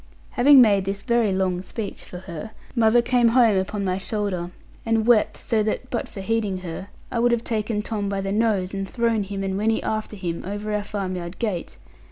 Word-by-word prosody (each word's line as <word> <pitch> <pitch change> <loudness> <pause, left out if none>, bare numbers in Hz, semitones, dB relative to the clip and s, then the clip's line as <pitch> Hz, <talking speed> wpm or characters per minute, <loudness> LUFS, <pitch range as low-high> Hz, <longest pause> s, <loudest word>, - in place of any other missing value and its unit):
Having 275 +1 +7
made 200 -5 +4
this 195 +1 -3
very 235 -4 +2
long 185 -1 0
speech 200 +2 -6
(for 180 - -9
her), 180 +2 -7 0.3
mother 235 0 +4
came 245 -1 +3
home 230 -3 +5
upon 195 +2 -1
my 185 0 0
shoulder, 195 -4 -2 0.3
and 225 -1 +1
wept 235 -3 +4
so 225 -3 0
that 220 +4 -2
(but 235 - -2
for 195 - -7
heeding 205 -2 -1
her) 180 +2 -6 0.2
I 235 - -1
would 240 +1 +3
have 235 -1 +1
taken 215 -2 -1
Tom 205 -3 -2
by 195 -1 -1
the 195 0 -3
nose, 205 -3 +1
and 195 -1 -3
thrown 230 -2 +1
him, 195 0 -4
and 190 -1 -2
Winnie 220 +1 +1
after 215 0 -3
him, 175 -4 -4
over 205 +3 -4
our 210 0 0
farm 195 -3 -3
yard 170 +1 -6
gate. 210 -7 -3
210 Hz, 210 wpm, -23 LUFS, 190-225 Hz, 0.3 s, Having